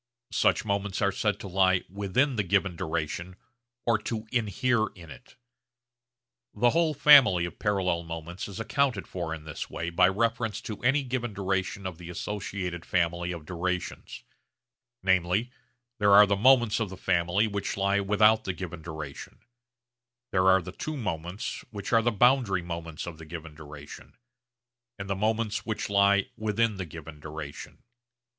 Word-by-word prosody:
Such - - +2
moments 100 -1 -1
are 100 - +3
said 105 +2 -1
to - - -6
lie 95 -1 +3
'within' 100 +8 0
the 105 - +1
given 95 -1 +1
duration 85 +2 -3 0.5
or 115 -2 +3
to 110 +1 -4
'inhere' 115 0 +1
in 85 -4 -12
it. 125 - -14 1.2
The 120 +3 +3
whole 165 -2 +2
family 125 -13 +7
of 85 - -8
parallel 95 -4 0
moments 85 +1 -6
is 100 +1 -8
accounted 130 +4 0
for 85 -3 -4
in 80 -1 -5
this 80 -1 -6
way 85 +1 -4
by 90 +2 +5
reference 115 +1 0
to 105 -3 -7
any 135 +4 +2
given 120 -4 -3
duration 95 0 -2
of 90 -3 -5
the 85 -1 -9
associated 90 -2 -4
family 85 0 0
of 85 -3 -7
durations. 90 +2 -4 0.8
Namely, 95 +5 +2 0.5
there 100 -1 +4
are 105 +1 +9
moments 115 +3 +4
of 110 -3 -1
the 95 - -9
family 90 +2 +1
which 100 -2 -3
lie 100 +1 +2
without 105 +2 +4
the 95 - -1
given 85 -2 -7
duration, 80 -3 -8 0.9
there 95 0 +2
are 95 -1 +5
the 90 - -7
two 155 +10 -5
moments 90 - -4
which 100 +1 -6
are 115 - +6
the 120 - +2
boundary 120 -5 +3
moments 85 -2 -6
of 85 -2 -8
the 80 - -10
given 80 -1 -8
duration, 75 -1 -12 0.8
and 100 -1 -6
the 100 - -1
moments 110 +1 -1
which 110 -2 -3
lie 100 0 +4
within 110 0 0
the 95 -2 -5
given 80 -1 -10
duration. 75 -1 -8
95 Hz, 160 wpm, -28 LUFS, 85-110 Hz, 1.2 s, are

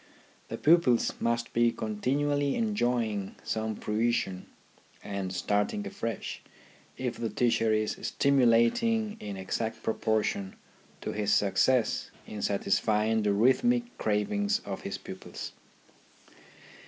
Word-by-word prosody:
The - - -5
pupils 150 -7 +4
must 115 0 -1
be 120 0 +4
continually 140 +7 0
enjoy 165 - +1
'' 110 - -3
ing 100 -2 -5
some 110 0 -2
fruition 105 -4 -1 0.6
and 100 -2 -4
starting 105 - 0
afresh 115 - -4 0.6
if 125 -2 -3
the 115 - -2
teacher 115 0 +2
is 110 0 +1
stimulating 140 - +3
in 100 -2 -6
exact 110 +4 -3
proportion 110 -3 -1 0.5
to - - -3
his 105 -1 -1
success 115 +5 +2 0.2
in 105 -1 -7
satisfying 110 +2 +1
the 105 -1 +2
rhythmic 240 - +2
cravings 205 - +1
of - - -5
his - - -4
pupils. - - -8
115 Hz, 115 wpm, -29 LUFS, 105-140 Hz, 0.6 s, pupils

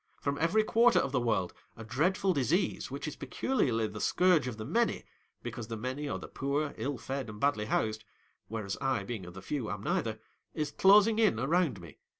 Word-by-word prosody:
From 140 0 -2
every 180 +8 +3
quarter 235 +2 +4
of 140 - +1
the 130 - +1
world, 105 -7 0 0.2
a 115 - -8
dreadful 180 - +1
disease 145 - 0
which - - -5
is - - -5
peculiarly 125 - 0
the 105 0 -6
scourge 180 -7 +3
of 120 -4 -5
the 110 - -6
many, - - +1 0.4
because 115 -3 -6
the 115 -1 -5
many 130 +6 -4
are - - -2
the - - -8
poor, 145 +2 -2
ill 140 -1 -2
fed, 135 0 -4
and 105 0 -9
badly 140 -6 +1
housed 110 0 -1 0.2
— - - -42
whereas 105 -3 -4
I, 135 -1 0
being 110 -7 -6
of 90 - -11
the 95 - -9
few, 135 -4 -3
am 100 0 -5
neither 110 -1 -1 0.2
— - - -49
is 150 -2 -2
closing 210 +5 +5
in 210 - +3
around 150 - +1
me. 85 -4 -13
130 Hz, 210 wpm, -31 LUFS, 110-160 Hz, 0.4 s, closing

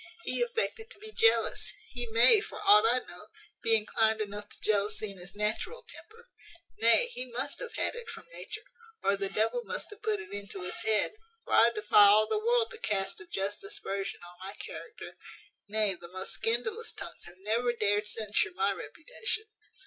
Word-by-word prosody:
He - - -1
affected 460 -1 -1
to - - -12
be 435 +1 -9
jealous: 455 +1 +3 0.2
he 245 -1 -3
may, 235 - +6
for - - -7
aught 210 +2 +7
I 245 +2 +2
know, - - -10 0.3
be 225 - +4
inclined 220 0 +2
enough 205 -1 -4
to - - -12
jealousy 210 0 +1
in 195 - -12
his 180 +3 -9
natural 215 - -2
temper; 470 +2 -12 0.5
nay, 235 - +5
he 255 - -5
must 265 +4 -3
have - - -6
had - - 0
it 480 -1 -8
from - - -9
nature, 430 -2 -7 0.4
or 200 - +3
the 195 0 -2
devil 225 - 0
must - - -4
have 420 - -12
put 425 -1 0
it 415 - -9
into 200 -2 -6
his 180 - -2
head; 220 -1 +2 0.3
for - - -4
I 230 - +7
defy 210 -2 +6
all 210 +2 +7
the 425 - 0
world 470 +1 +2
to 455 - -7
cast 195 - -1
a 350 - -11
just 200 - -2
aspersion 295 - -4
on 175 0 -13
my 195 +2 -6
character: 450 - -9 0.5
nay, 210 -1 +1
the 175 -1 -11
most 185 +2 -6
scandalous 425 - -1
tongues - - -9
have 175 +1 -11
never 225 +5 +1
dared 210 -2 +1
censure 210 -3 -1
my 195 +2 +2
reputation. 435 - -4
220 Hz, 190 wpm, -30 LUFS, -, 0.5 s, aught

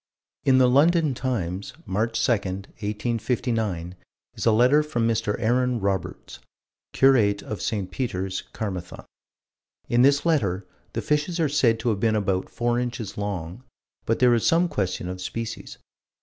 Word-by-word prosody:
In 130 -1 +5
the 130 - +6
London 155 +3 +4
Times, 100 -8 -3
March 110 +5 0
2, - - +2
1859, 105 -1 -2 0.4
is - - -3
a - - +6
letter 125 +7 +5
from 135 -7 -1
Mr. 110 -2 0
Aaron 125 +2 +1
Roberts, 95 -3 -3 0.5
curate 110 -7 +3
of 105 - -6
St. 100 -4 -2
Peter's, 95 -7 -3
Carmathon. 90 -5 -5 0.8
In 120 +1 +3
this 140 +3 +4
letter 100 - +1 0.3
the - - -3
fishes 150 +4 0
are 160 - +3
said 125 -6 +2
to 120 - 0
have 105 -3 0
been 110 0 +2
about 95 -3 -1
four 120 0 0
inches 120 -4 -4
long, 100 0 -4 0.4
but 115 - +2
there 125 -1 +5
is 115 - +1
some 170 +2 +3
question 95 - -2
of 90 0 -6
species. 115 +3 -5
115 Hz, 150 wpm, -24 LUFS, 100-125 Hz, 0.8 s, the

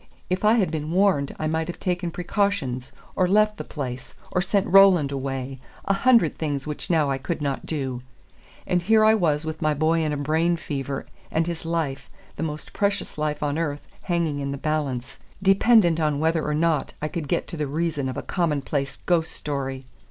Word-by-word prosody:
If 185 +2 0
I 215 +2 +5
had 190 -9 +2
been 155 -1 -3
warned 180 -6 +2
I 155 - -3
might 160 +1 0
have 175 - -6
taken 180 -1 -1
precautions, 170 - -1 0.2
or 185 - +3
left 210 +2 +3
the - - -5
place, 130 -4 -6 0.2
or 180 - +1
sent 195 +1 +1
Roland 185 -7 +6
away, 135 -1 -4 0.3
a 195 - +2
hundred 230 -4 +3
things 145 -4 -2
which 150 -1 -5
now 155 -5 +3
I 135 - -1
could 165 +5 -3
not 140 -2 -3
do; 130 -5 -3 0.6
and 180 -1 +1
here 215 +4 +4
I 220 - +6
was 160 -7 +1
with 160 0 -5
my 155 -1 +2
boy 160 +3 +2
in 155 - 0
a 145 - -1
brain 160 +4 +1
fever, 140 -3 -4 0.2
and 160 +1 +1
his 170 -1 -5
life, 160 -5 -2 0.3
the - - -6
most 155 -1 -4
precious 200 -6 -1
life 150 -1 -1
on 145 +2 0
earth, 145 -3 -3 0.2
hanging 170 -5 -1
in 140 0 -3
the 140 - -3
balance, 140 -5 -2 0.2
dependent 195 -3 +5
on 150 -2 +1
whether 160 0 +1
or 150 - 0
not 160 -2 +1
I 150 - -2
could 155 -1 -4
get - - -1
to 170 - -6
the 150 -1 -1
reason 150 -2 -1
of 130 - -5
a - - -4
commonplace 145 -5 -1
ghost 165 -3 +2
story! 135 -2 -4
155 Hz, 200 wpm, -24 LUFS, 145-175 Hz, 0.6 s, Roland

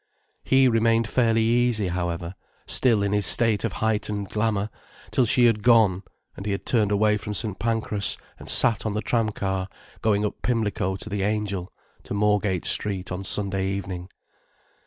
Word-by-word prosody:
He 135 0 +4
remained 115 -1 +2
fairly 115 -2 +2
easy, 115 -3 +1
however, 85 -1 -3 0.3
still 115 -6 +3
in 100 0 0
his 105 -3 +4
state 115 -3 +4
of 115 -5 -2
heightened 105 -2 -1
glamour, 105 -1 -1 0.4
till 125 -3 +2
she 120 +2 +4
had 115 -3 +3
gone, 110 -5 +4 0.3
and - - -8
he 100 - 0
had 100 - -5
turned 110 -4 +1
away 105 +1 +2
from 105 0 -6
St. 105 -4 -3
Pancras, 110 -2 -1 0.2
and - - -10
sat 115 -4 +3
on 110 - -2
the 105 - -2
tram 115 -3 +1
car 95 -2 -3 0.3
going 105 -1 +1
up 105 - -5
Pimlico 105 -5 -1
to 95 - -8
the 105 -2 -3
"Angel", 100 -3 -2 0.3
to - - -6
Moorgate 105 -3 +1
Street 95 -3 -1
on 90 +2 -4
Sunday 95 -1 -1
evening. 95 -2 -5
105 Hz, 170 wpm, -24 LUFS, 100-115 Hz, 0.4 s, He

